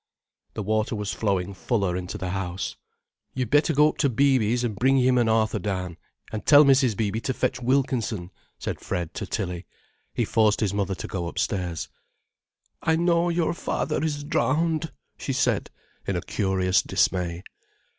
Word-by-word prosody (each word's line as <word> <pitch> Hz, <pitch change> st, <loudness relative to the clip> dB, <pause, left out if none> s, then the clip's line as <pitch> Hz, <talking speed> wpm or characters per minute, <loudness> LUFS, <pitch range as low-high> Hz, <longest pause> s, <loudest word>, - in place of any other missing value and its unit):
The 110 Hz, -, -3 dB
water 110 Hz, +2 st, 0 dB
was 105 Hz, -1 st, -3 dB
flowing 100 Hz, -3 st, -1 dB
fuller 95 Hz, +1 st, -1 dB
into 90 Hz, -1 st, -4 dB
the 90 Hz, -1 st, -4 dB
house. 95 Hz, -1 st, -3 dB, 0.6 s
"You'd 125 Hz, -4 st, -2 dB
better 150 Hz, +3 st, +4 dB
go 150 Hz, 0 st, +5 dB
up -, -, -8 dB
to 140 Hz, -, +3 dB
Beeby's 125 Hz, -2 st, +2 dB
and 115 Hz, -4 st, -1 dB
bring 130 Hz, +6 st, +3 dB
him 125 Hz, -1 st, +4 dB
and 115 Hz, -2 st, +2 dB
Arthur 110 Hz, -1 st, +2 dB
down, 90 Hz, -4 st, -3 dB, 0.3 s
and 110 Hz, -, -4 dB
tell 145 Hz, -1 st, +8 dB
Mrs. 130 Hz, -6 st, +4 dB
Beeby 110 Hz, 0 st, -1 dB
to 130 Hz, -, -2 dB
fetch 125 Hz, -1 st, -1 dB
Wilkinson," 120 Hz, -7 st, 0 dB, 0.3 s
said -, -, -5 dB
Fred 85 Hz, -1 st, -3 dB
to 105 Hz, -, -5 dB
Tilly. 90 Hz, -3 st, -4 dB, 0.5 s
He -, -, +1 dB
forced 110 Hz, -2 st, +3 dB
his 100 Hz, -3 st, 0 dB
mother 100 Hz, -1 st, -1 dB
to -, -, -6 dB
go 85 Hz, -3 st, -3 dB
upstairs. 90 Hz, -1 st, -2 dB, 0.9 s
"I 160 Hz, -, +2 dB
know 170 Hz, +1 st, +2 dB
your 170 Hz, -1 st, +1 dB
father 155 Hz, -3 st, -2 dB
is 145 Hz, -2 st, -2 dB
drowned," 160 Hz, +2 st, 0 dB, 0.3 s
she -, -, -3 dB
said, -, -, +1 dB, 0.4 s
in -, -, 0 dB
a -, -, -1 dB
curious 95 Hz, -2 st, +1 dB
dismay. 90 Hz, -1 st, 0 dB
110 Hz, 165 wpm, -25 LUFS, 95-135 Hz, 0.9 s, tell